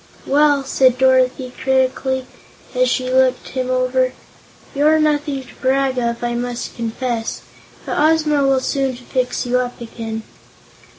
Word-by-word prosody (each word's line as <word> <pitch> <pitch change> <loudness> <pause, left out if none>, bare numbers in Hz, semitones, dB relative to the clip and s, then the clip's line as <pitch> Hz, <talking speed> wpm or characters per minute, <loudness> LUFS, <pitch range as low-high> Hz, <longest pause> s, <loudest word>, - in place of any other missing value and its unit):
"Well," 290 0 +3
said 260 -2 +3
Dorothy 260 -1 +2
critically, 260 0 +1 0.5
as - - +2
she 255 -1 -1
looked 260 0 +2
him 255 -1 -3
over, 255 0 +1 0.6
"you're 300 +3 +4
nothing 295 -3 0
to - - -16
brag 265 0 +1
of, 235 0 -2
I 240 0 -1
must 240 0 -4
confess. 230 0 -3 0.4
But - - -2
Ozma 305 -1 +3
will 270 -1 +3
soon 270 -1 -1
fix 250 0 -2
you 250 +1 +1
up 245 -1 -4
again." 225 -1 -6
260 Hz, 135 wpm, -19 LUFS, 250-275 Hz, 0.6 s, you're